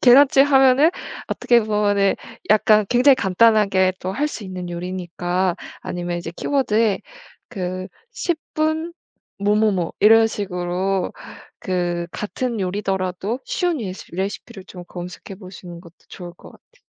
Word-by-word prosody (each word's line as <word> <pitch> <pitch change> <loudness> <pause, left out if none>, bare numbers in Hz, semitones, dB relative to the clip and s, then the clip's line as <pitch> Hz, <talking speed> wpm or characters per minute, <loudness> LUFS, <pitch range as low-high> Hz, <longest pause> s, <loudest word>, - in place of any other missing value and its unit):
계란찜 270 +2 +7
하면은 270 +2 +5 0.4
어떻게 240 -1 +3
보면은 205 -2 +1 0.3
약간 215 0 +5
굉장히 255 +3 +5
간단하게 195 -3 +3
또 185 - -3
할 295 +8 0
수 295 - -6
있는 185 -2 -6
요리니까 180 +1 -2 0.3
아니면 175 -1 -4
이제 170 -1 -6
키워드에 225 -7 +1 0.5
그 185 -4 -4 0.2
10분 320 -4 -2 0.5
뭐뭐뭐 205 -3 +1
이런 225 +2 +7
식으로 185 -2 -2 0.5
그 175 -2 -2
같은 235 +4 -4
요리더라도 190 +2 -2
쉬운 365 -10 -1
레시 190 -5 -6
레시피를 195 +1 -5
좀 180 -2 -10
검색해 180 +2 -8
보시는 180 -3 -10
것도 170 -2 -16
좋을 175 -2 -9
것 - - -15
같아요. - - -24
195 Hz, 285 characters per minute, -21 LUFS, 180-235 Hz, 0.5 s, 계란찜